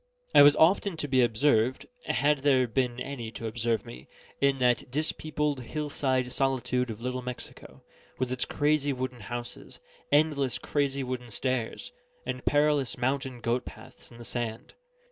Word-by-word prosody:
I - - +9
was 145 0 +8
often 180 +2 +3
to 150 - -3
be 130 -2 +3
observed 120 +1 +2 0.2
(had 145 +4 +2
there 135 -2 +3
been 125 +1 -1
any 125 -3 -5
to 115 - -6
observe 115 -1 -1
me) 60 - -11 0.3
in 140 -1 +3
that 125 -1 +2
dis 150 +5 +1
peopled, 150 -2 -2
hill 150 +5 -4
side 130 -3 0
solitude 125 -1 0
of 110 -1 -6
Little 125 +1 -3
Mexico, 125 0 -9 0.3
with 130 -1 -1
its 130 - 0
crazy 145 -1 +1
wooden 130 -1 -4
houses, 120 +3 -7 0.3
endless 145 -4 +2
crazy 140 -2 -1
wooden 125 -1 -5
stairs, 125 0 -3 0.3
and 130 0 -4
perilous 145 -2 +2
mountain 130 0 -2
goat 120 +2 0
paths - - -12
in 115 - -14
the 120 - -10
sand. 115 -2 -4
130 Hz, 160 wpm, -28 LUFS, 120-145 Hz, 0.3 s, I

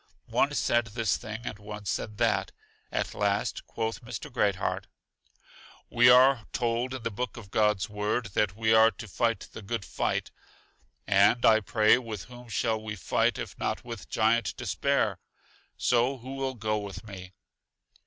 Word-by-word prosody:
One - - +3
said 120 0 +2
this 110 -2 0
thing 110 +1 -6
and 105 -3 -6
one 105 0 -8
said 105 +2 -3
that; 115 -2 +1 0.4
at - - -2
last 100 0 -1
quoth 115 0 -3
Mr. 120 +3 -7
Great 105 -6 +2
heart: - - -3 1.0
We 120 +1 +6
are 125 -2 +6
told 120 +2 -1
in 130 - -7
the 115 - -2
book 120 +1 -4
of 100 -5 -11
God's 105 -2 +2
Word, 105 +2 -2
that 100 -2 +1
we 110 0 +2
are 110 0 +7
to 115 - -9
fight 115 +1 -1
the - - -9
good 110 0 -4
fight. - - -2 0.7
And, 100 +4 +4
I 110 -1 +7
pray, 110 +2 +4
with 110 -6 -6
whom 125 -1 -13
should 110 0 0
we 110 -1 -6
fight 95 - +1
if - - -6
not - - -2
with 115 -3 -8
Giant 115 +1 +1
Despair? 125 -4 0 0.6
So 125 +2 +2
who 130 +2 -8
will 135 -1 -3
go 110 -2 -1
with 100 +1 -8
me? 95 -2 -9
110 Hz, 165 wpm, -28 LUFS, 105-120 Hz, 1.0 s, are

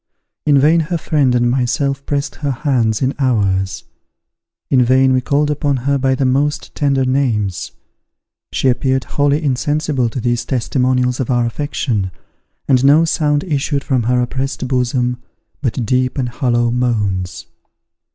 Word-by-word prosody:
In 145 -1 +5
vain 155 +5 +4
her 165 +2 -1
friend 145 -5 +1
and 120 0 +2
myself 135 +2 -1
pressed 145 0 -2
her 145 - -3
hands 120 -4 0
in 130 +2 +1
ours: 100 -7 0 0.8
in 130 -2 +3
vain 130 +2 +3
we 130 - +2
called 145 +3 +1
upon 145 -1 0
her 140 0 +1
by 130 0 +1
the 135 - 0
most 140 +3 0
tender 140 -2 +1
names; 115 -8 -1 0.8
she - - 0
appeared 130 +1 +1
wholly 145 +4 0
insensible 145 -1 0
to 125 - -5
these 120 0 0
testimonials 125 0 0
of 130 - -2
our 120 -2 +2
affection, 120 -6 -2 0.6
and 130 -2 +3
no 150 +4 +5
sound 150 -3 +1
issued 145 -4 -1
from 130 -4 0
her 125 +2 +1
oppressed 135 +2 -3
bosom, 125 -1 0 0.4
but 125 -3 -1
deep 130 +2 0
and 125 -3 -1
hollow 120 -2 0
moans. 100 -8 -1
130 Hz, 150 wpm, -17 LUFS, 120-140 Hz, 0.8 s, In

